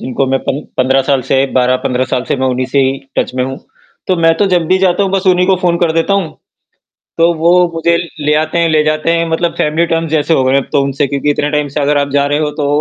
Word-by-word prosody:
जिनको 130 +1 -2
मैं 135 0 0
15 135 -1 0
साल 135 -2 +2
से 135 +1 +1
12-15 125 0 0
साल 125 - 0
से - - 0
मैं 130 0 -1
उन्हीं 130 0 -1
से 140 +2 -1
ही 135 0 +1 0.2
टच - - -1
में 130 - -1
हूँ, 135 +1 -6 0.5
तो 185 - +1
मैं 165 0 +3
तो 205 - +1
जब 170 -2 +1
भी 185 +2 +2
जाता 185 +1 +1
हूँ 195 - -1
बस 195 0 -1
उन्हीं 180 0 +3
को 190 -1 +3
फ़ोन 170 -1 +2
कर 170 -2 +1
देता 165 +4 +1
हूँ, 190 -5 -1 0.9
तो 170 +1 +3
वो 170 +1 +1 0.2
मुझे 170 +1 +1 0.2
ले 150 0 0
आते 160 +2 -4
हैं, 170 - +2
ले 155 -1 +2
जाते 155 +2 0
हैं 170 0 +1
मतलब 170 +1 -1
फैमिली 160 +3 +1
टर्म्स 165 -1 -2
जैसे 155 +1 +1
हो 135 - +2
गए 130 +1 +2
अब 140 - -2
तो 145 -2 +2
उनसे 140 +1 -1
क्योंकि 140 +2 -2
इतने 145 0 -1
टाइम 150 -1 0
से 145 +1 -3
अगर 145 +1 +1
आप 140 0 0
जा 140 0 +2
रहे 145 +1 0
हो 150 -1 -1
तो 140 - 0
150 Hz, 265 wpm, -13 LUFS, 135-170 Hz, 0.9 s, मैं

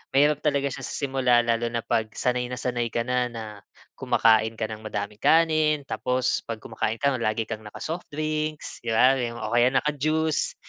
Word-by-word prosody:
mahirap 145 +1 +4
talaga 140 -2 +1
siya 135 - -6
sa - - -5
simula 130 -4 +2
lalo 115 0 +1
na 115 -1 -3
'pag 110 -2 0
sanay 125 0 0
na 125 - -4
sanay 120 -2 -1
ka 115 - 0
na 125 0 +1
na 115 -1 -7 0.6
kumakain 110 0 +3
ka - - -3
ng 110 - -6
madaming 105 -1 -5
kanin, 155 -2 +3
tapos 125 -1 0
'pag 115 -1 -4
kumakain 110 - -2
ka, 140 +3 +2
lagi 110 0 0
kang 110 -1 -6
naka-soft 165 +10 -6
drinks, 155 0 -3
di 120 - -5
ba? 130 +3 +6 0.3
O 110 - -3
kaya 120 +1 +5
naka 150 +3 +1
juice. 155 +2 0
125 Hz, 185 wpm, -25 LUFS, 115-150 Hz, 0.6 s, ba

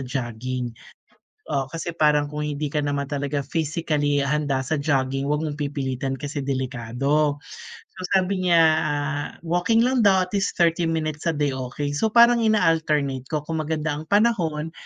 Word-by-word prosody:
jogging. 125 -1 -4 0.7
Oh, 135 -3 -1
kasi 165 +1 -4
parang 150 -2 +3
kung 150 - -4
hindi 150 0 -2
ka 150 - +1
naman 145 -1 -1
talaga 140 0 -2
physically 150 -2 0
handa 140 -2 0
sa 150 +2 -1
jogging 135 -1 0
huwag 150 +2 0
mong 150 -1 -4
pipilitan 135 -2 -2
kasi 145 +1 -4
delikado. 135 +3 0 0.6
So, 185 - -9 0.2
sabi 185 0 -1
niya, 170 - +5 0.2
ah, 145 0 -2 0.2
walking 175 +7 +2
lang 255 -2 +2
daw 190 -2 +5
at 185 - -18
least 195 - -1
30 170 0 +3
minutes 155 -1 -2
a - - -3
day, 145 -2 0
okey. 135 +3 -4
So, 220 +9 +1
parang 235 +1 +6
ina-alternate 155 - +1
ko 150 -2 -2
kung 160 -1 -2
maganda 155 0 -2
ang 155 - -9
panahon 175 -8 +1
150 Hz, 160 wpm, -23 LUFS, 140-165 Hz, 0.7 s, parang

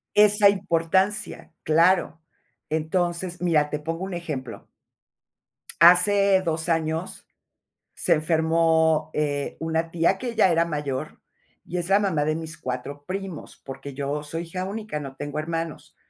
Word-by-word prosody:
Esa 210 0 +6
importancia, 190 +2 0
claro. 165 +1 +3 0.5
Entonces, 175 +3 -1
mira, 155 -4 +2
te 150 - -2
pongo 165 +4 -4
un 195 - -5
ejemplo 135 -10 -6 1.1
hace 190 +2 +6
2 160 0 -2
años 160 +1 -2 0.7
se - - +2
enfermó, 160 0 +2
eh, 145 -2 -2
una 160 0 -1
tía 170 +3 +1
que 245 -2 -4
ya 210 -4 +4
era 165 0 +3
mayor 145 -5 -4 0.4
y 180 - -5
es 175 0 -2
la 195 +1 +4
mamá 165 -8 0
de 155 - 0
mis 160 0 -7
4 130 +3 -6
primos, 190 -4 -6
porque 135 +1 -8
yo 145 +2 -3
soy 165 +3 -4
hija 180 +2 -5
única, 210 -4 -5
no 135 -2 -8
tengo 145 +1 -5
hermanos. 165 0 -5
165 Hz, 140 wpm, -24 LUFS, 155-185 Hz, 1.1 s, Esa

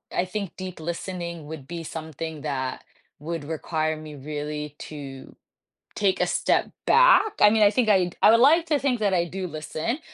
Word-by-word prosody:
I 180 - +1
think 195 0 -5
deep 185 -2 -7
listening 170 -1 -5
would 150 -4 -8
be 170 -1 -6
something 160 -1 -6
that 130 -3 -3 0.4
would 165 0 -5
require 155 0 -2
me 155 -1 -9
really 150 +1 -5
to 135 -3 -9 0.6
take 195 -2 +1
a 180 - +2
step 175 - +1 0.2
back. - - +6
I 210 - +9
mean, 220 -1 +4
I 205 - +7
think 225 0 +1
I'd 185 -4 +3
I - - +8
would 230 - +5
like 320 +7 +5
to 300 -2 +2
think 255 -4 0
that 205 -2 +1
I 175 -2 +2
do 185 +2 -5
listen, 160 - -4
170 Hz, 185 wpm, -25 LUFS, 155-205 Hz, 0.6 s, I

